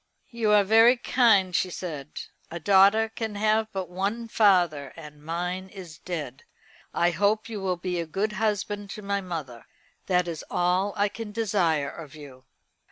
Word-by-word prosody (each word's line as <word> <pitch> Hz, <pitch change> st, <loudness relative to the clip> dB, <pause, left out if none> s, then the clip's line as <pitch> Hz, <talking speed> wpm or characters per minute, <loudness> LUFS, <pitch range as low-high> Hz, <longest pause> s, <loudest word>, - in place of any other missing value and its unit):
"You 235 Hz, -3 st, -1 dB
are 210 Hz, -1 st, +6 dB
very 225 Hz, +5 st, +6 dB
kind," 210 Hz, -8 st, +3 dB
she 185 Hz, -, +1 dB
said. 155 Hz, -5 st, -6 dB, 0.3 s
"A 170 Hz, -, -6 dB
daughter 200 Hz, +5 st, +5 dB
can 220 Hz, -1 st, -5 dB
have 215 Hz, +1 st, +1 dB
but 190 Hz, -2 st, -4 dB
one 200 Hz, +6 st, -3 dB
father, 175 Hz, -10 st, +2 dB
and 150 Hz, -2 st, -12 dB
mine 180 Hz, +4 st, -4 dB
is 180 Hz, -6 st, -11 dB
dead. 150 Hz, -8 st, -6 dB, 0.5 s
I 175 Hz, +1 st, +2 dB
hope 205 Hz, +6 st, +1 dB
you 215 Hz, -3 st, -6 dB
will 185 Hz, -2 st, -1 dB
be 180 Hz, 0 st, -3 dB
a 165 Hz, -, -3 dB
good 200 Hz, +7 st, -1 dB
husband 205 Hz, -1 st, -2 dB
to 210 Hz, -, -9 dB
my 200 Hz, 0 st, -1 dB
mother. 155 Hz, -10 st, -7 dB, 0.4 s
That 180 Hz, -1 st, +2 dB
is 165 Hz, -2 st, -5 dB
all 180 Hz, +3 st, 0 dB
I 205 Hz, 0 st, +3 dB
can 215 Hz, +1 st, -7 dB
desire 185 Hz, -10 st, 0 dB
of 155 Hz, -4 st, -11 dB
you." 135 Hz, -4 st, -13 dB
190 Hz, 165 wpm, -26 LUFS, 170-210 Hz, 0.5 s, are